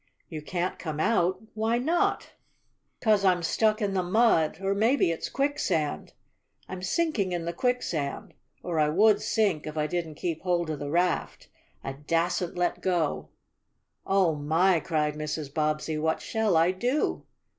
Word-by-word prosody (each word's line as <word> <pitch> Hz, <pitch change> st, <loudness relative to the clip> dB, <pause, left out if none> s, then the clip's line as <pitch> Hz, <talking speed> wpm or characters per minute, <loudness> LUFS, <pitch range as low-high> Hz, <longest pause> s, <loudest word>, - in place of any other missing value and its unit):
"You 155 Hz, -3 st, -6 dB
can't 175 Hz, +3 st, -3 dB
come 155 Hz, -3 st, -5 dB
out? 185 Hz, -1 st, +2 dB
Why 220 Hz, +2 st, 0 dB
not?" 320 Hz, +8 st, 0 dB, 0.7 s
"'Cause 215 Hz, -3 st, +3 dB
I'm 180 Hz, -2 st, +3 dB
stuck 215 Hz, +5 st, +1 dB
in 200 Hz, -1 st, 0 dB
the 190 Hz, -, +1 dB
mud 180 Hz, -5 st, +2 dB
or 195 Hz, 0 st, 0 dB
maybe 220 Hz, -1 st, +2 dB
it's 165 Hz, -, -4 dB
quicksand. 220 Hz, -, -1 dB, 0.5 s
I'm 185 Hz, -1 st, -7 dB
sinking 200 Hz, -, 0 dB
in 170 Hz, -1 st, -3 dB
the 170 Hz, -, -3 dB
quicksand. 245 Hz, -, -2 dB, 0.3 s
Or 170 Hz, -3 st, -2 dB
I 150 Hz, -1 st, +3 dB
would 210 Hz, +6 st, +4 dB
sink 195 Hz, -9 st, 0 dB
if 155 Hz, 0 st, -6 dB
I 150 Hz, -, +1 dB
didn't 165 Hz, -1 st, -3 dB
keep 165 Hz, +1 st, -3 dB
hold 175 Hz, -3 st, 0 dB
of 150 Hz, -, -4 dB
the 145 Hz, -, -4 dB
raft. 175 Hz, +2 st, -1 dB, 0.3 s
I 135 Hz, -, -4 dB
dassn't 165 Hz, +5 st, -1 dB
let 175 Hz, 0 st, 0 dB
go!" 175 Hz, -5 st, -1 dB, 0.7 s
"Oh, 190 Hz, -4 st, +2 dB
my!" 160 Hz, +5 st, +2 dB
cried 150 Hz, -2 st, -1 dB
Mrs. 150 Hz, -1 st, -5 dB
Bobbsey. 155 Hz, 0 st, -1 dB
"What 160 Hz, +1 st, 0 dB
shall 220 Hz, -6 st, 0 dB
I 165 Hz, +3 st, +4 dB
do?" 245 Hz, +10 st, -1 dB
175 Hz, 155 wpm, -27 LUFS, 155-205 Hz, 0.7 s, would